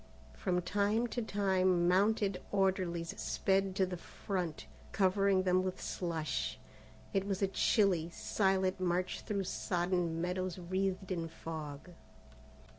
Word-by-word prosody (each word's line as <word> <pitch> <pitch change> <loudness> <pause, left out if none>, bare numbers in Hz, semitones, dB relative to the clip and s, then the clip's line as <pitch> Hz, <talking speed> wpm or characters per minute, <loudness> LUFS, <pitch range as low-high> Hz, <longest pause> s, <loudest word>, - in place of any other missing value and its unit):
From 180 -2 -1
time 205 +5 +1
to 240 - -2
time 185 -4 +2
mounted 195 0 +2
orderlies 185 -4 +1
sped 195 0 +1
to 190 -2 +3
the 180 -1 -5
front, 175 -2 -4 0.3
covering 195 -1 +3
them 185 0 +3
with 185 0 -3
slush. 165 -4 -2 0.6
It 195 0 +1
was 195 0 -1
a - - +4
chilly, 190 -4 +2
silent 190 +1 +1
march 180 0 0
through 200 -2 -2
sodden 175 -2 -1
meadows 180 +1 -2
wreathed 190 +1 -2
in 170 -2 -1
fog. 160 0 -7
185 Hz, 120 wpm, -34 LUFS, 175-195 Hz, 0.6 s, a